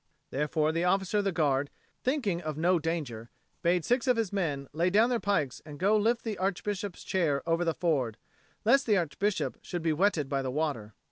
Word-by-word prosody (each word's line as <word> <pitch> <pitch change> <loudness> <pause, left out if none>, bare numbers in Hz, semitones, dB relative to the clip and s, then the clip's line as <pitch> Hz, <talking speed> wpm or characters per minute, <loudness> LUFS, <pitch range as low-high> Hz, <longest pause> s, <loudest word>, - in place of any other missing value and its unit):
Therefore 150 +2 +1
the 165 +2 -1
officer 190 +3 +2
of 205 - -1
the 195 - +2
Guard, 145 -4 +1 0.3
thinking 240 - 0
of 155 -3 -4
no 175 +2 +3
danger, 145 -9 -3 0.3
bade 175 -1 +2
six 245 +2 +1
of 250 -2 +4
his 220 -4 -1
men 145 -8 -1
lay 170 +4 +2
down 220 +6 +4
their 240 - +1
pikes 155 - 0
and 150 -1 -10
go 200 +7 +3
lift 230 +3 +2
the 215 -5 -4
Archbishop's 195 0 -2
chair 165 -7 0
over 165 +1 +2
the 165 -2 0
ford, 135 -10 0 0.5
lest 265 +4 +4
the 210 -2 +4
Archbishop 190 +4 -1
should 175 -3 -5
be 160 -1 +2
wetted 165 -4 +2
by 135 0 -1
the 130 - -3
water. 130 -7 -2
170 Hz, 200 wpm, -29 LUFS, 150-205 Hz, 0.5 s, of